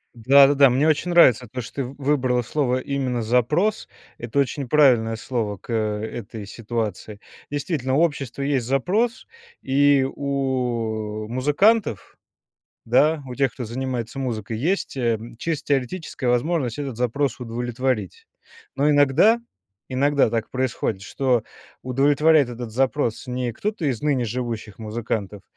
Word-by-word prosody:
Да, 135 +5 +6
да, 145 - +3
да, 140 -1 +6
мне 135 +5 +2
очень 155 +3 +1
нравится 130 -9 +5
то, 130 -1 -4
что - - -11
ты 140 - -1
в 135 +3 -9
выбрала 130 -3 +1
слово 130 0 0
именно 130 -3 -2
"запрос". 150 - +1 0.3
Это 120 +3 -5
очень 140 0 -1
правильное 120 -7 +4
слово 110 -3 -3
к 115 - -7
этой 110 0 -3
ситуации. 110 -2 -5 0.3
Действительно, 145 -3 -2
у 155 - +3
общества 140 -5 -1
есть 135 -4 0
запрос, 205 - 0 0.4
и 140 0 +3
у, 120 -6 -2
э, - - -10
музыкантов, 150 - +1 0.7
да, 150 +6 +3
у 125 - -7
тех, 135 -3 +1
кто 125 - -5
занимается 125 +1 -4
музыкой, 115 -4 -3
есть, 170 - -1
э, 120 -3 +1
м, 115 +1 -9
чисто 150 +2 -4
теоретическая 140 +1 -4
возможность 125 0 0
этот 135 -5 -5
запрос 125 +2 -1
удовлетворить. 120 -3 -3 0.5
Но 145 +2 +3
иногда, 150 - +4 0.5
иногда 140 -1 +2
так 115 -1 -2
происходит, 125 -6 -2
что 125 +2 0 0.4
удовлетворяет 145 +3 +3
этот 120 -1 -6
запрос 130 -1 0
не 125 -1 -3
кто-то 205 - -4
из 130 -6 -1
ныне 140 -5 +1
живущих 115 -3 -5
музыкантов, 105 -3 -4
130 Hz, 140 wpm, -23 LUFS, 115-145 Hz, 0.7 s, Да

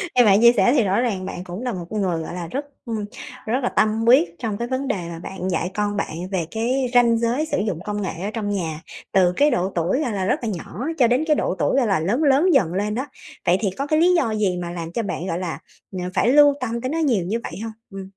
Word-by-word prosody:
nghe 245 - +7
bạn 200 0 +5
chia 235 0 +8
sẻ 245 +1 +3
thì 240 - +4
rõ 195 +1 +1
ràng 200 -7 -1
bạn 180 -1 -6
cũng 180 +4 -7
là 250 -2 -2
một 175 -2 -5
con 215 -1 -2
người, 175 -4 0
gọi - - -7
là, 175 -1 -5
rất, 280 - -4 0.2
ưm, 220 -3 -3 0.4
rất 250 +5 -1
là 245 - +1
tâm 220 +1 +1
quyết 175 -9 +5
trong 215 -4 -3
cái 235 - -3
vấn 260 +1 -2
đề - - 0
mà 165 - -7
bạn 190 +1 -5
dạy 180 +1 -1
con 205 -1 -1
bạn 180 - -3 0.2
về 175 -4 -1
cái 250 +4 0
ranh 235 -2 +5
giới 240 +7 0
sử - - -2
dụng 200 -6 -2
công 210 0 -3
nghệ 175 -2 -4
ở 210 - -2
trong 215 -3 -3
nhà, 165 -6 -3 0.3
từ 180 -2 +4
cái 290 0 +4
độ 185 +2 0
tuổi, 180 - +1
gọi 250 - -1
là, 190 -2 -1
rất 220 - +1
là 230 - -1
nhỏ, 195 +2 -6 0.2
cho 245 -4 +5
đến 250 +6 +2
cái 305 - +4
độ 185 - -1
tuổi, 260 - +1
gọi 250 -5 +3
là, 195 -5 +2
lớn 210 - 0
lớn 295 +6 +4
dần 185 - +3
lên 210 +2 -1
đó. 260 - -2 0.4
Vậy 175 +2 +4
thì 210 - 0
có 280 +1 -2
cái 310 +1 +2
lý 355 +2 +5
do 260 -10 +1
gì 195 -4 0
mà 175 0 -4
làm 170 -1 -6
cho 230 +6 -2
bạn, 190 -3 -4
gọi 170 - -2
là, 175 -3 -4 0.3
ờ, 185 - -5
phải - - +2
lưu 290 +1 +7
tâm 235 -1 -2
tới 255 - -2
nó 315 - -2
nhiều 240 - +1
như 215 +6 -1
vậy - - -6
hông? 225 -1 -5 0.2
Ừm. 195 -1 -7
210 Hz, 285 wpm, -22 LUFS, 185-250 Hz, 0.4 s, chia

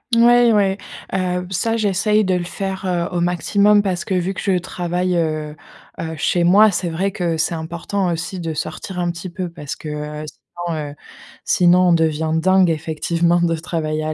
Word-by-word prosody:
Ouais, 240 0 +6
ouais, 195 -2 +2 0.4
heu 180 -1 0
b 180 +1 -10
ça, 225 +5 0
j'essaye 210 0 +2
de 190 - +1
le 175 -1 -2
faire, 190 +1 -4
heu, 175 -1 -1
au 175 - 0
maximum 200 +4 +3
parce 185 -3 -2
que 200 - -2
vu 185 +1 0
que - - -7
je 190 -2 +1
travaille, 180 0 -2
heu, 155 -2 -1 0.5
heu, 160 -1 -4
chez 170 +3 +1
moi, 205 +4 +6
c'est 180 -1 -2
vrai 190 +5 -1
que 175 -5 -1
c'est 165 +1 0
important 170 +4 -3
aussi 175 +3 -4
de 165 -2 -3
sortir 180 +4 -5
un 175 -1 0
petit 175 +2 -7
peu 180 0 -5
parce 150 -4 -7
que, 155 - -8
heu, 150 0 -5 0.4
sinon, 170 -2 -2
heu, - - -13 0.5
sinon 180 0 +4
on 175 - +5
devient 160 -1 +1
dingue, 185 0 +4
effectivement, 170 +2 0
de 165 -1 +2
travailler 155 -2 -3
à 155 - -1
175 Hz, 195 wpm, -20 LUFS, 165-190 Hz, 0.5 s, Ouais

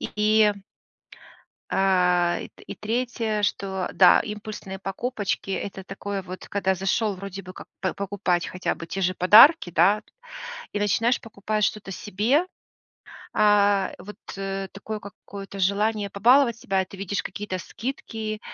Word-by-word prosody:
И, - - -5
и 215 0 +4 1.2
А 180 -2 +2
и - - -8
т - - -11
3, 225 -1 -1
что, 190 -2 -1
да, 180 -2 +6
импульсные 210 -2 -7
покупочки 200 +1 -3
это 195 0 -4
такое 195 +1 -5
вот, 185 0 -9
когда 190 -1 0
зашел 195 +3 0
вроде 195 +1 -7
бы 185 0 -10
как - - -11
п 185 -2 -1
покупать 195 -3 -1
хотя 180 - -2
бы 165 - -8
те 195 - -4
же 185 0 +1
подарки, 215 - +7
да, 180 +6 +4 0.7
и 205 - -1
начинаешь 225 +4 +2
покупать 215 -1 -2
что-то 210 -2 -3
себе. 220 - 0 0.9
А 205 -2 +3
вот 205 +4 -10 0.6
такое 215 +2 -6
какое-то 200 0 -10
желание 205 +2 +1
побаловать 235 +4 +4
себя, 195 -4 0
и - - -11
ты 195 - -12
видишь 195 +1 -2
какие-то 195 -1 -5
скидки, 220 0 -5
200 Hz, 140 wpm, -25 LUFS, 190-215 Hz, 1.2 s, подарки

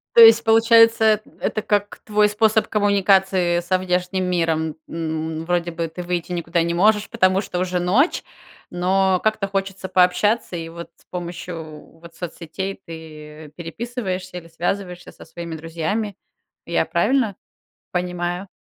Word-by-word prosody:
То 235 - +9
есть, 225 0 +9
получается, 225 0 +5 0.2
эт - - -25
это 215 - -1
как 205 -1 -1
твой 210 -1 +3
способ 220 +1 +2
коммуникации 190 -4 +2
со 180 +2 0
внешним 185 0 -1
миром. 165 -3 0
М, 160 0 -4
вроде 175 0 0
бы 165 0 -3
ты 170 +3 -8
выйти 175 0 -3
никуда 170 -1 0
не 170 0 -1
можешь, 210 +4 +3
потому 185 +1 +2
что 180 -3 -4
уже 180 -1 -1
ночь, 215 - +2 0.5
но 185 +1 +2
как-то 215 -2 +1
хочется 195 -1 -3
пообщаться, 185 +3 +2
и 165 -1 -5
вот 170 +1 -9
с - - -27
помощью 170 -3 -8
вот 170 0 -14
соцсетей 180 +3 -6
ты 155 -2 -10
переписываешься 185 0 -5
или 165 - -9
связываешься 175 +2 -4
со - - -14
своими 170 0 -7
друзьями. 170 +6 -3 0.5
Я 170 -1 +1
правильно 205 +6 +1 0.6
понимаю? 180 +1 -3
180 Hz, 140 wpm, -21 LUFS, 170-200 Hz, 0.6 s, То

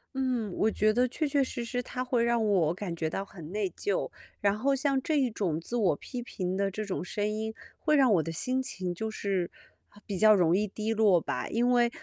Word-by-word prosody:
嗯， 250 -6 -1
我 220 - +3
觉 215 0 +2
得 245 +3 +2
确 305 +6 -2
确 285 -1 +2
实 255 -2 -2
实 245 +1 -2
它 250 +1 -4
会 245 -2 +1
让 235 -1 +2
我 180 -7 +3
感 185 -1 -5
觉 160 -1 -2
到 195 - -3
很 175 -6 -11
内 205 -3 0
疚， 410 - -2 0.3
然 200 0 +2
后 275 +3 +2
像 275 -1 +1
这 310 - 0
一 260 -4 +2
种 185 -8 -1
自 235 +9 -4
我 190 -9 +3
批 250 - -7
评 185 -6 -3
的 200 0 +1
这 215 +3 -4
种 200 -3 -3
声 205 +3 -2
音， 220 +1 -3 0.3
会 305 - +2
让 265 -4 +5
我 165 - +2
的 165 - -5
心 255 +11 0
情 185 -8 -3
就 220 +5 -3
是 195 -4 -2 0.4
很 205 - -20
比 200 - -4
较 215 +2 +7
容 175 -3 +3
易 210 +2 +1
低 215 +3 -2
落 205 -6 +4
吧。 - - -3
因 240 +2 +1
为 240 -1 +4
215 Hz, 255 characters per minute, -29 LUFS, 190-245 Hz, 0.4 s, 较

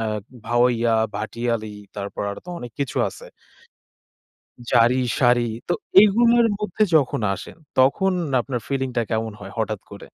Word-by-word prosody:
আ 115 - -1 0.4
ভাওইয়া, 120 -1 +2 0.2
ভাটিয়ালি, 110 -1 -3 0.2
তারপর 100 0 -5
আর 100 - -6
তো 180 - -15
অনেক 120 -5 -8
কিছু 140 - -3
আছে - - -12 1.5
জাড়ি, 120 +1 +4 0.2
শাড়ি, 120 -2 +4 0.2
তো 175 - +3 0.3
এগুলোর 235 +3 +5
মধ্যে 210 0 0
যখন 135 -6 +2
আসেন, 160 - -10 0.2
তখন 190 +9 +3 0.3
আপনার 125 0 -4
ফিলিংটা 130 -3 -1
কেমন 110 0 -1
হয়, 100 -1 -9
হঠাৎ 110 -2 -1
করে? 100 - -10
120 Hz, 135 wpm, -22 LUFS, 110-140 Hz, 1.5 s, এগুলোর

